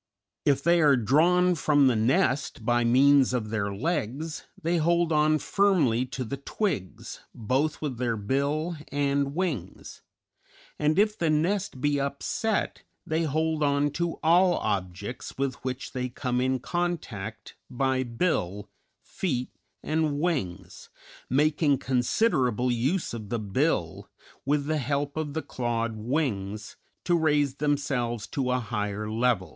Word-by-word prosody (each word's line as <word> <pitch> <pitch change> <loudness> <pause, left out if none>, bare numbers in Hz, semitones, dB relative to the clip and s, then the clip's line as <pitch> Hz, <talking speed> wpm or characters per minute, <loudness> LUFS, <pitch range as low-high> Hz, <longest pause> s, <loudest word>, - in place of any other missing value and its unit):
If 140 -1 +2
they 170 +1 +4
are 145 -3 +5
drawn 170 - +3
from 145 -3 +3
the 130 -3 +4
nest 130 +1 +1
by 120 0 +2
means 135 +2 +5
of 110 -3 -3
their 100 -2 -1
legs, 150 - -3
they 170 +2 0
hold 170 +1 +2
on 155 0 +3
firmly 155 - +2
to 130 0 -4
the 135 +4 -5
twigs, 140 - -3 0.2
both 135 +7 -1
with 130 -6 -3
their 120 -3 0
bill 140 - -1
and 140 0 0
wings; 155 - -4 0.8
and 150 +2 +2
if 210 +1 +3
the 165 -5 0
nest 170 +1 0
be 145 0 +1
upset 140 +10 -2 0.2
they 160 +1 0
hold 160 +1 0
on 145 0 +2
to 170 +3 -1
all 175 +2 +5
objects 100 +3 -4
with 135 -1 -2
which 130 0 -4
they 125 0 -3
come 125 0 -2
in 130 +1 +1
contact 115 - -4 0.2
by 130 +1 0
bill, 115 - -2 0.3
feet, 130 -9 -3 0.3
and 155 -2 0
wings, 145 - -3 0.4
making 150 +1 +2
considerable 125 - +1
use 135 +10 0
of 110 -3 -7
the 120 - -1
bill, 100 - -1 0.4
with 145 0 +1
the 155 +1 0
help 140 +2 -2
of 155 -2 -3
the 160 - -2
clawed 115 -3 -2
wings, 110 -4 -2 0.3
to 175 - +3
raise 145 -4 +2
themselves 135 -6 -1
to 130 -2 -2
a 125 - +2
higher 105 -2 -3
level. 110 -5 +1
140 Hz, 140 wpm, -27 LUFS, 120-155 Hz, 0.8 s, are